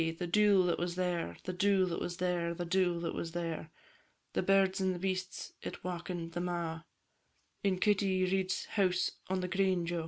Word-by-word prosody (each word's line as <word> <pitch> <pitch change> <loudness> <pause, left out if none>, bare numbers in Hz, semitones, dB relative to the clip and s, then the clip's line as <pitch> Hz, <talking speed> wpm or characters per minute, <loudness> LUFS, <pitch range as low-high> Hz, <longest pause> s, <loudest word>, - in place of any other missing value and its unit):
the 175 - -2
dule 200 +1 +5
that 175 -1 +1
was 175 0 -2
there, 175 - -1
The 185 - -3
dule 195 0 +3
that 170 - -2
was 175 0 -3
there, 175 -2 0
The 175 - -3
dule 175 -1 +2
that 170 - -2
was 165 -1 -4
there; 165 -2 -3 0.6
The - - +1
birds 195 -1 +3
and 185 -2 0
beasts 185 0 -3
it - - -7
wauken'd 175 -1 -4
them 175 +1 -2
a', 165 -2 -3 0.8
In 195 -2 +2
Kitty 195 -2 +2
Reid's 185 0 0
house 185 -3 +1 0.2
on 190 0 0
the 180 - -2
green, 190 -2 +1
Jo! 170 0 -1
180 Hz, 185 wpm, -33 LUFS, 175-190 Hz, 0.8 s, dule